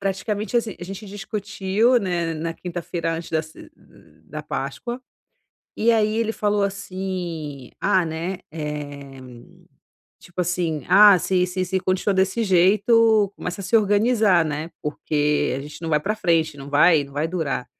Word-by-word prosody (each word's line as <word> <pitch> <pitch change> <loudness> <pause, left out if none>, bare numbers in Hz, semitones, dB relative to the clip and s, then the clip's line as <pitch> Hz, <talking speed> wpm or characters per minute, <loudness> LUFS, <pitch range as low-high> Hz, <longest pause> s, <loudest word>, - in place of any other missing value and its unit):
Praticamente 205 +4 -2
assim, 225 -3 -1
a 175 - -5
gente 195 +3 -8
discutiu, 205 +3 0
né, 175 -5 -2
na 165 +1 -3
quinta-feira 170 -1 -4
antes 165 0 -7
da 160 -1 +1
ce 155 0 -14
da - - -13
da - - -15
páscoa, 240 +1 -5 0.8
e 230 +2 +3
aí 220 -1 +2
ele 225 -1 0
falou 210 -1 0
assim: 185 -8 -5
"Ah, 190 -3 +2
né, 165 +4 -4
eh, 145 -3 -6 1.0
tipo 180 0 -7
assim, 170 -3 -1
ah, 200 0 +8
se 180 +1 +1
se 185 +1 -2
se 190 +1 -1
continua 185 +2 0
desse 190 +4 +1
jeito 210 +3 +4
começa 180 +2 -5
a - - -7
se 210 +5 +3
organizar, 210 -3 +3
né, 155 +2 -4
porque 150 -1 0
a - - -4
gente 150 +3 -10
não 165 - -3
vai 150 - +3
pra 205 +8 -1
frente, 165 -6 +1
não 140 +1 -9
vai 150 0 +5
não 140 - -15
vai 150 +2 0
durar". 155 -8 -2
180 Hz, 160 wpm, -22 LUFS, 160-205 Hz, 1.0 s, ah